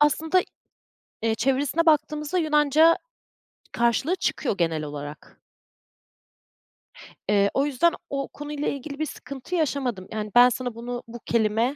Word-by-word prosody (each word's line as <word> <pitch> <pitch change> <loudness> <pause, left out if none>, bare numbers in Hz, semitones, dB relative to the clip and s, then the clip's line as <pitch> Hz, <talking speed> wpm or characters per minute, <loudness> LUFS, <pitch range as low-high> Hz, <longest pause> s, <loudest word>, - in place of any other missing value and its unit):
aslında, 320 +4 +3 0.8
eee, 225 -1 +2
çevirisine 270 +7 +1
baktığımızda 305 +2 +2
Yunanca 310 +1 +4 0.7
karşılığı 235 +9 +1
çıkıyor 260 - -1
genel 165 -3 0
olarak. 145 -1 -8 1.9
Eee, 200 -1 +4
o 275 - +2
yüzden 295 +4 +2 0.2
o 275 -1 -2
konuyla 295 0 -5
ilgili 280 +1 -4
bir 310 - 0
sıkıntı 280 +3 -7
yaşamadım. 265 - -1
Yani, 215 -1 -4
ben 245 +1 +8
sana 245 -1 -4
bunu 240 +1 -5
bu 240 +1 -9
kelime, 230 +3 +1
270 Hz, 125 wpm, -25 LUFS, 225-300 Hz, 1.9 s, ben